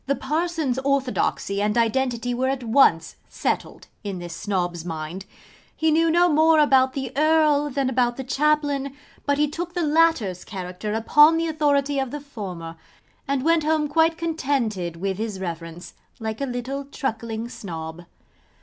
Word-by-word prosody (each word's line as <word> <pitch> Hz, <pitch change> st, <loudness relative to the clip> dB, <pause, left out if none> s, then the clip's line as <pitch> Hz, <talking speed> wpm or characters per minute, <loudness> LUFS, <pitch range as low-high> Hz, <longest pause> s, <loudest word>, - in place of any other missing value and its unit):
The 280 Hz, -, +2 dB
Parson's 310 Hz, -4 st, -1 dB
orthodoxy 265 Hz, -7 st, 0 dB
and 210 Hz, +2 st, 0 dB
identity 245 Hz, +1 st, 0 dB
were 255 Hz, +2 st, 0 dB
at 265 Hz, -2 st, -2 dB
once 225 Hz, -9 st, +3 dB
settled -, -, -3 dB, 0.2 s
in 200 Hz, -3 st, -4 dB
this 175 Hz, -1 st, -7 dB
Snob's 175 Hz, -3 st, -2 dB
mind. 165 Hz, +3 st, -6 dB, 0.5 s
He 320 Hz, 0 st, +1 dB
knew 330 Hz, +1 st, +3 dB
no 345 Hz, +2 st, +4 dB
more 320 Hz, 0 st, +4 dB
about 265 Hz, -3 st, +4 dB
the 265 Hz, -2 st, -5 dB
Earl 305 Hz, -1 st, +3 dB
than 275 Hz, -1 st, -1 dB
about 245 Hz, -2 st, +1 dB
the 265 Hz, -, -4 dB
Chaplain, 285 Hz, 0 st, 0 dB, 0.3 s
but 285 Hz, 0 st, +2 dB
he 300 Hz, +1 st, +3 dB
took 340 Hz, +4 st, -6 dB
the 350 Hz, -, 0 dB
latter's 300 Hz, -, +2 dB
character 185 Hz, +1 st, -5 dB
upon 295 Hz, +8 st, +5 dB
the 330 Hz, -, 0 dB
authority 290 Hz, -3 st, +1 dB
of 265 Hz, -1 st, -1 dB
the 295 Hz, -, -5 dB
former; 185 Hz, -, -8 dB, 0.5 s
and 275 Hz, 0 st, -1 dB
went 330 Hz, -1 st, +3 dB
home 310 Hz, -1 st, +1 dB
quite 320 Hz, +2 st, +2 dB
contented 260 Hz, -, -1 dB
with 190 Hz, +3 st, -3 dB
his 215 Hz, -3 st, -3 dB
Reverence, 170 Hz, -1 st, -6 dB, 0.3 s
like 220 Hz, +2 st, -4 dB
a 275 Hz, -, -1 dB
little 260 Hz, +3 st, -4 dB
truckling 230 Hz, -5 st, -4 dB
Snob. 165 Hz, -6 st, -7 dB
265 Hz, 160 wpm, -23 LUFS, 205-300 Hz, 0.5 s, upon